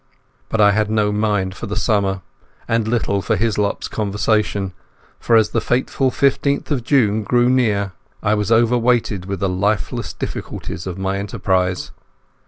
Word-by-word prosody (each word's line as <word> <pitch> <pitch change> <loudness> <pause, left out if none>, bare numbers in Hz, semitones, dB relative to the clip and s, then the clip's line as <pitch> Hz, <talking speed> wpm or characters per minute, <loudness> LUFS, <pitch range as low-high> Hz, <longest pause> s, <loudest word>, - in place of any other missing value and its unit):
But 110 - -1
I 105 -1 +6
had 105 +1 +1
no 105 -1 +1
mind 105 -3 0
for 115 - -6
the 105 - -4
summer, 100 -4 0 0.5
and 115 -1 +1
little 110 -4 0
for 110 - 0
Hislop's 105 -1 0
conversation, 105 -2 -1 0.5
for 115 - +2
as 110 -2 +4
the 115 - 0
fateful 130 +3 0
fifteenth 140 +3 +1
of 130 -5 0
June 110 -5 +2
drew 120 +3 +2
near 105 -6 +1 0.3
I 105 - +2
was 105 0 -1
overweighed 115 -4 +2
with 100 -1 -4
the 95 - +1
hopeless 100 +2 -1
difficulties 85 - -6
of 90 0 -5
my 95 +1 -2
enterprise. 95 -2 -1
105 Hz, 155 wpm, -19 LUFS, 100-115 Hz, 0.5 s, I